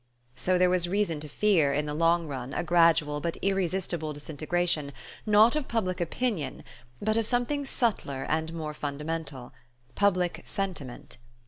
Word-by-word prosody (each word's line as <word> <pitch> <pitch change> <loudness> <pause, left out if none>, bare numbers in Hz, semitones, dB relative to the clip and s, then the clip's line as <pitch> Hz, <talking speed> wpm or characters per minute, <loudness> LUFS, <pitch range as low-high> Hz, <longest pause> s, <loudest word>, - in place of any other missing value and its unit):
So 180 +8 +1
there 180 0 +4
was 175 -1 +2
reason 195 -5 0
to 150 0 -8
fear, 170 -5 +3
in 150 +1 0
the 150 - -3
long 165 +2 +3
run, 135 -3 -5
a - - 0
gradual 165 -4 +3
but 170 +2 -2
irresistible 180 -4 0
disintegration, 155 0 -1 0.3
not 215 +5 +6
of 305 -3 -1
public 185 -6 -1
opinion, 175 - -2 0.4
but 215 +1 +1
of 225 -1 +1
something 255 +4 0
subtler 200 - -1
and 160 +1 0
more 155 -2 -4
fundamental: 150 -2 -5 0.4
public 185 -3 +1
sentiment. 165 -13 -5
170 Hz, 145 wpm, -28 LUFS, 150-195 Hz, 0.4 s, not